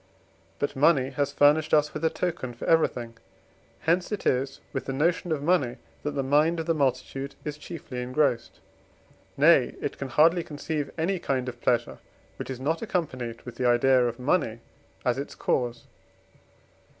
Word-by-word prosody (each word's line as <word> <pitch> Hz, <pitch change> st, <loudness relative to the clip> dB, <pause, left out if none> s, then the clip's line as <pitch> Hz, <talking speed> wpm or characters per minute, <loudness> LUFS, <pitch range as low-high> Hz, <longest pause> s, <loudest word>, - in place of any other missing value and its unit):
But 145 Hz, -, -2 dB
money 135 Hz, -2 st, +3 dB
has 145 Hz, -1 st, -1 dB
furnished 150 Hz, +2 st, +4 dB
us 150 Hz, 0 st, +2 dB
with 155 Hz, -, -5 dB
a 160 Hz, -, +4 dB
token 160 Hz, -10 st, -3 dB
for -, -, -7 dB
everything: 120 Hz, -8 st, +1 dB, 0.6 s
hence 175 Hz, +4 st, +1 dB
it 210 Hz, -, -3 dB
is 135 Hz, +1 st, 0 dB
with -, -, -3 dB
the 135 Hz, -, -3 dB
notion 165 Hz, +4 st, 0 dB
of 145 Hz, -3 st, -1 dB
money, 145 Hz, -8 st, +2 dB, 0.2 s
that 150 Hz, -, -3 dB
the 135 Hz, -, 0 dB
mind 150 Hz, +5 st, +3 dB
of 165 Hz, -, -3 dB
the 165 Hz, -, +2 dB
multitude 135 Hz, -1 st, -1 dB
is 150 Hz, -1 st, -3 dB
chiefly 150 Hz, -5 st, -7 dB
engrossed: 125 Hz, -2 st, 0 dB, 0.8 s
nay, -, -, +5 dB
it -, -, -4 dB
can 135 Hz, -, -3 dB
hardly 165 Hz, +6 st, +4 dB
conceive 150 Hz, -1 st, -4 dB
any 175 Hz, +3 st, 0 dB
kind 130 Hz, -5 st, -1 dB
of 120 Hz, -1 st, -7 dB
pleasure, 120 Hz, -, 0 dB, 0.4 s
which -, -, -6 dB
is 130 Hz, -2 st, -5 dB
not 155 Hz, +5 st, -1 dB
accompanied 130 Hz, -, -3 dB
with 125 Hz, -, -9 dB
the 125 Hz, -, +1 dB
idea 125 Hz, +1 st, +4 dB
of 120 Hz, 0 st, -4 dB
money 125 Hz, -4 st, 0 dB, 0.4 s
as 130 Hz, +3 st, -1 dB
cause. 120 Hz, -2 st, -1 dB
140 Hz, 165 wpm, -27 LUFS, 125-160 Hz, 0.8 s, nay